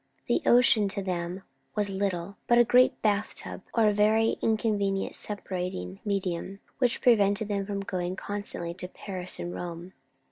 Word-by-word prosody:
The - - +1
ocean, 235 -4 +5
to 195 0 -3
them, 180 0 -3 0.3
was 205 -1 0
little 195 -1 -2
but 240 - +5
a 240 - +8
great 250 +2 +4
bath 210 -1 +1
tub; - - -7
or 225 -2 +4
a 210 - +3
very 215 +2 +3
inconvenient 210 -3 0
separating 180 - -4
medium, 195 -1 -2 0.2
which 250 -3 +1
prevented 205 -3 +3
them 200 -1 -1
from 200 -1 -3
going 185 -2 -3
constantly 200 -4 -3
to 180 +1 -7
Paris 185 -1 -1
and 175 0 -4
Rome. 175 +1 -7
200 Hz, 155 wpm, -28 LUFS, 180-210 Hz, 0.3 s, a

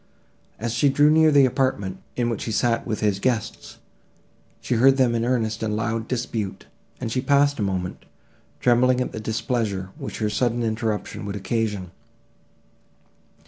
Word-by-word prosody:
As 115 +1 -3
she 130 +4 +3
drew 145 +2 +4
near 160 0 +5
the 140 -2 +6
apartment, 125 -7 -1 0.2
in 120 -1 0
which 115 - -4
he 115 - -3
sat 115 +1 +1
with 110 - -2
his 105 -3 +1
guests, 115 -1 -2 0.8
she - - -2
heard 135 +3 +5
them 125 -3 +3
in 115 -1 0
earnest 115 -3 0
and 105 -1 -1
loud 115 0 -2
dispute, 115 -6 -3 0.3
and 115 -3 -4
she 130 - 0
paused 140 +1 +3
a - - 0
moment, 95 -3 -3 0.5
trembling 125 +1 +3
at 125 - -2
the - - -6
displeasure, 110 -4 -2
which - - -6
her 110 - 0
sudden 120 +2 0
interruption 110 -2 -2
would 100 - -4
occasion. 105 -2 -2
115 Hz, 160 wpm, -23 LUFS, 105-125 Hz, 0.8 s, the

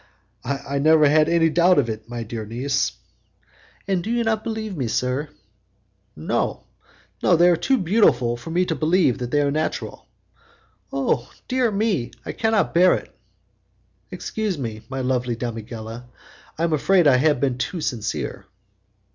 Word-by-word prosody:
"I 140 +1 -3
never 155 +1 +5
had 155 +1 +4
any 165 -1 +3
doubt 175 +2 +4
of 140 -5 +3
it, 110 0 -6
my 120 -1 -4
dear 110 0 -5
niece." 130 +5 -1 0.9
"And 190 -3 0
you 230 +3 -1
do 240 - +1
not 220 -1 0
believe 220 -3 -4
me, 130 -6 -2
sir?" 125 +6 -1 0.9
"No, 75 - -2 0.6
they 175 0 +5
are 175 - +5
too 220 +11 +1
beautiful 160 - +3
for 120 +6 -9
me 180 +3 +1
to 170 - -1
believe 160 -4 +2
them 140 +3 0
natural." 155 +1 -3 0.8
"Oh, 135 -3 -1 0.2
dear 255 -2 +1
me! 200 - 0 0.2
I - - -3
cannot 225 -2 +1
bear 180 +2 +5
it." - - -8 0.9
"Excuse 215 -5 -3
me, 110 -5 -5
my 135 0 -3
lovely 125 -2 -1
damigella, 115 0 -6 0.5
I 165 - -2
am 170 -1 +1
afraid 175 +4 +3
I 130 -3 +6
have 145 0 +2
been 130 -2 0
too 175 +7 -3
sincere." 115 -8 -3
145 Hz, 150 wpm, -22 LUFS, 125-180 Hz, 0.9 s, I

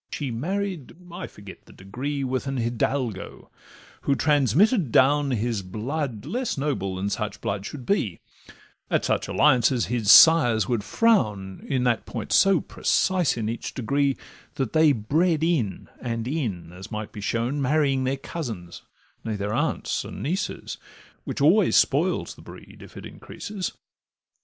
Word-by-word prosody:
She 140 -4 -3
married 180 - -3 0.2
(I 175 - -6
forget 100 -2 -13
the - - -16
pedigree) 135 +9 -4
With 130 +1 -2
an 135 0 -2
Hidalgo, 120 -1 -3 0.5
who 140 - +1
transmitted 150 - +3
down 145 +3 +4
His 115 -3 -1
blood 115 +5 -4
less 250 - -2
noble 135 -10 -2
than 95 +2 -2
such 105 -1 -3
blood 100 0 -3
should 135 -4 -8
be; 110 - 0 0.7
At - - +1
such - - 0
alliances 125 -4 +3
his 115 -4 0
sires 120 - +7
would 120 -4 -1
frown, 105 - +1
In 130 -3 +1
that 120 -3 0
point 115 -4 -4
so 195 -3 +5
precise 185 -8 +1
in 110 -2 -2
each 115 +1 -5
degree 140 +3 0 0.4
That 135 -6 -2
they 155 -1 +5
bred 155 +8 +1
in 135 - 0
and 115 -1 -3
in, 115 - -3
as 90 +1 -11
might 105 0 -5
be 105 -2 -8
shown, 120 +7 -1
Marrying 135 -1 +2
their 130 +1 -1
cousins—nay, 110 - -8
their 100 +1 -3
aunts, - - -1
and - - -8
nieces, 180 +8 -3 0.5
Which - - -4
always - - +4
spoils - - +2
the - - -16
breed, - - -13
if - - -13
it - - -8
increases. 200 -3 -6
130 Hz, 150 wpm, -25 LUFS, 110-150 Hz, 0.7 s, sires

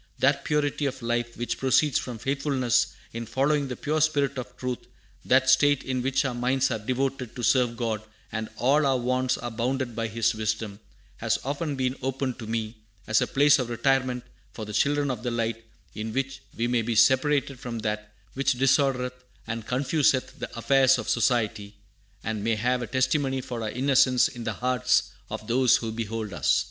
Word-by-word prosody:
That 140 +1 +2
purity 150 -1 0
of 130 -2 -5
life 120 0 -2
which 120 - -3
proceeds 135 +2 +3
from 125 -3 -6
faithfulness 135 -1 +1 0.3
in 115 0 -5
following 140 +4 +1
the 125 - -4
pure 155 +3 -1
spirit 145 -3 +2
of 125 - -8
truth, 125 -1 -3 0.4
that 130 0 +3
state 145 +1 +4
in 130 -1 -2
which 135 +2 +1
our 130 - -1
minds 130 +2 +1
are 110 - -1
devoted 130 +1 -2
to 120 - -6
serve 120 -2 +3
God 115 -3 -2 0.3
and 110 0 -4
all 140 +4 +3
our 135 -1 +3
wants 130 +1 0
are 120 - -5
bounded 120 +1 -2
by 115 0 -1
His 115 +1 +1
wisdom, 110 -1 -3 0.4
has - - 0
often 145 +2 -2
been 130 -1 -1
opened 130 -1 -2
to 110 - -7
me 110 0 -3 0.3
as 110 - +2
a - - +1
place 145 +1 +4
of 125 -2 -2
retirement 125 0 +1 0.3
for 110 - -6
the 105 - -7
children 145 +3 +2
of 120 -4 -5
the 120 - -2
light, 115 -1 -2 0.3
in 110 +1 -4
which 135 0 -2 0.2
we 115 - 0
may 120 -1 +1
be 115 +1 -2
separated 135 +3 +3
from 120 -2 -5
that 105 0 -3 0.2
which 135 0 +1
disordereth 125 -1 +1 0.2
and 115 0 -5
confuseth 135 +1 +1
the - - -4
affairs 135 +2 +4
of - - -4
society, 110 -4 0 0.5
and 110 -1 -3
may 115 0 +1
have 125 +4 0
a 120 - -4
testimony 130 +2 +1
for 125 -2 -5
our 110 - -2
innocence 130 +1 +3
in 120 -2 -8
the 110 - -1
hearts 125 -2 +2 0.2
of - - -6
those 125 +2 +4
who 115 -1 -4
behold 110 -2 -4
us." - - +2
125 Hz, 190 wpm, -26 LUFS, 115-135 Hz, 0.5 s, state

